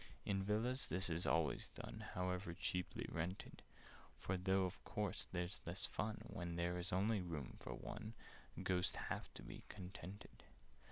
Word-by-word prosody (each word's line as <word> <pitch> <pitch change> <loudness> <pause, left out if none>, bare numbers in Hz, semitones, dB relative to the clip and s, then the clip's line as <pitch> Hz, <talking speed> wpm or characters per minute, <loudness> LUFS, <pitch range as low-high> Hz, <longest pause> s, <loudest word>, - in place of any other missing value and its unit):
"In 95 -1 +3
Villas 110 +6 +2
this 95 0 +2
is 85 +2 +1
always 85 -3 +3
done— - - -5
However 90 -1 +1
cheaply 90 0 0
rented: 85 +4 -2 0.6
For, 95 - +1
though 95 +1 +4
of 90 +1 -4
course 105 -4 0
there's 90 +1 -1
less 85 +3 0
of - - -5
fun 105 0 0
When 85 -2 -2
there 85 +1 +2
is 90 +4 -1
only 100 +3 +4
room 80 -7 -2
for - - -3
one, 110 +1 -4 0.5
Ghosts 90 -1 +3
have - - -2
to - - -7
be - - -6
contented. 95 +2 -7
90 Hz, 160 wpm, -43 LUFS, 90-100 Hz, 0.6 s, though